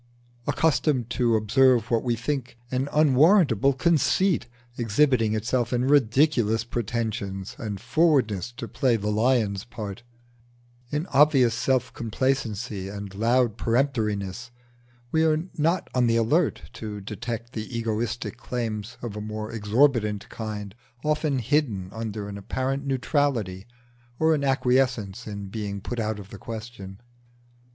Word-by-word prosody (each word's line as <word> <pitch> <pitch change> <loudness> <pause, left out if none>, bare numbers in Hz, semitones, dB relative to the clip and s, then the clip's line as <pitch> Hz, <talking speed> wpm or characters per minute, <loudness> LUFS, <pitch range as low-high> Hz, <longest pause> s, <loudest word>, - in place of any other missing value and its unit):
Accustomed 145 -6 +1
to 120 -3 +2
observe 115 +2 +3
what 115 -1 +3
we 120 -2 +1
think 125 +1 -3
an 130 +2 -1
unwarrantable 150 - +4
conceit 170 +1 +2 0.3
exhibiting 115 -1 +2
itself 120 +2 0
in 125 0 +1
ridiculous 130 -4 +3
pretensions 110 -4 -3
and 105 -6 -4
forwardness 125 - +2
to 120 -1 -6
play 130 -2 +1
the 105 -1 -1
lion's 110 -3 +1
part, 105 -3 -7 0.9
in 150 +3 -1
obvious 135 -4 +5
self 130 +2 0
complacency 115 -4 -2
and 100 -1 -7
loud 115 +2 +1
peremptoriness, 115 -4 0 0.6
we 160 0 +3
are 160 0 +2
not 165 +4 +1
on 125 -2 +3
the 115 - +2
alert 145 +9 +1
to 105 -2 -6
detect 115 +4 -6
the 110 +2 -5
egoistic 115 +1 -2
claims 110 -4 -4
of 115 -4 -5
a 105 - -4
more 110 0 -5
exorbitant 110 -1 +2
kind 105 -3 -6 0.3
often 150 -2 +1
hidden 115 -8 0
under 110 -2 -4
an 100 0 -6
apparent 130 +7 -2
neutrality 125 - 0 0.5
or 160 0 +3
an 145 -2 0
acquiescence 125 -7 +1
in 100 -1 -5
being 100 -1 -4
put 120 +5 -5
out 110 -1 -1
of 100 -1 -10
the 100 - -9
question. 110 -4 -8
115 Hz, 130 wpm, -25 LUFS, 105-135 Hz, 0.9 s, obvious